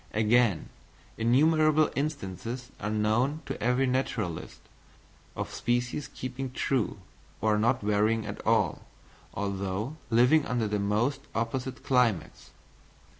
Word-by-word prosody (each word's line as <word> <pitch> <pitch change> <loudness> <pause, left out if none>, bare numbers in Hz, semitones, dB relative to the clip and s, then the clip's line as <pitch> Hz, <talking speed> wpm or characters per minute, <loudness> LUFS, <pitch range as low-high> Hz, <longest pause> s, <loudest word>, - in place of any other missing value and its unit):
Again, 110 -4 +3 0.5
innumerable 155 +6 +3
instances 125 - -4
are 105 - -3
known 115 +8 +1
to - - -5
every 125 +3 +2
naturalist, 125 -9 -2 0.8
of - - -4
species 125 +4 -1
keeping 130 +1 -5
true, 130 -4 -1 0.4
or 105 0 +2
not 120 +4 +2
varying 105 +2 +2
at 100 0 -6
all, 110 -6 +1 0.5
although 100 - -3
living 125 +7 +5
under 120 -3 0
the 105 0 -1
most 110 +8 0
opposite 125 +3 -3
climates. 115 - +1
120 Hz, 110 wpm, -28 LUFS, 105-130 Hz, 0.8 s, living